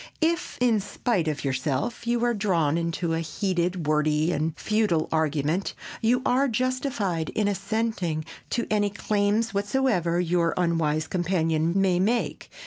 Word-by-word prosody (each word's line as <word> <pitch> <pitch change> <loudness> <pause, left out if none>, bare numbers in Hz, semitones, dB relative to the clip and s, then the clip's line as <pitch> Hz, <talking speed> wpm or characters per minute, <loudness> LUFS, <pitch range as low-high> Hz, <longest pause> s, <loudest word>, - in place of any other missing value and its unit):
If, 335 +2 0
in 240 -3 +3
spite 200 -2 -1
of 150 -2 -2
yourself, 135 - -2
you 240 0 +1
are 240 - +2
drawn 175 -8 +1
into 170 0 -1
a 165 - 0
heated, 175 +1 -1
wordy 155 +2 +2
and 160 0 -1
futile 210 -7 +1
argument, 160 +3 0 0.3
you 245 +3 +2
are 265 +3 +3
justified 240 - -1
in 210 -1 +2
assenting 200 -5 -1 0.2
to 235 - -1
any 205 -1 +2
claims 210 +2 0
whatsoever 200 -5 +1
your 170 -1 +1
unwise 165 -3 +1
companion 165 -2 0
may 185 -2 +3
make. 230 +6 0
180 Hz, 135 wpm, -26 LUFS, 160-220 Hz, 0.3 s, in